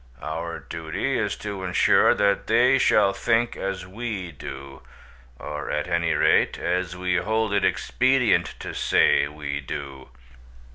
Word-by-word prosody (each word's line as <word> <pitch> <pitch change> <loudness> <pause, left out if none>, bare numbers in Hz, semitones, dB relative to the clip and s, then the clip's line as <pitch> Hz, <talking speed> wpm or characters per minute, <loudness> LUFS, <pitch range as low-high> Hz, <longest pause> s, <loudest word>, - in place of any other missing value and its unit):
Our 80 +2 -4
duty - - -4
is - - -1
to 100 -2 -5
ensure 90 -1 +4
that 100 -1 +1
they 125 +4 +4
shall 100 -5 +3
think 115 +4 0
as 95 -1 -4
we 100 -2 -5
do, 70 -1 -9 0.6
or 75 +2 -6
at 75 +2 -2
any 85 -1 0
rate, - - +3
as 90 -1 -2
we 90 -1 0
hold 110 +2 0
it 100 - +1
expedient 130 -1 +1
to - - -6
say - - +3
we 75 -1 -5
do." 65 -1 -7
90 Hz, 140 wpm, -24 LUFS, 75-105 Hz, 0.6 s, ensure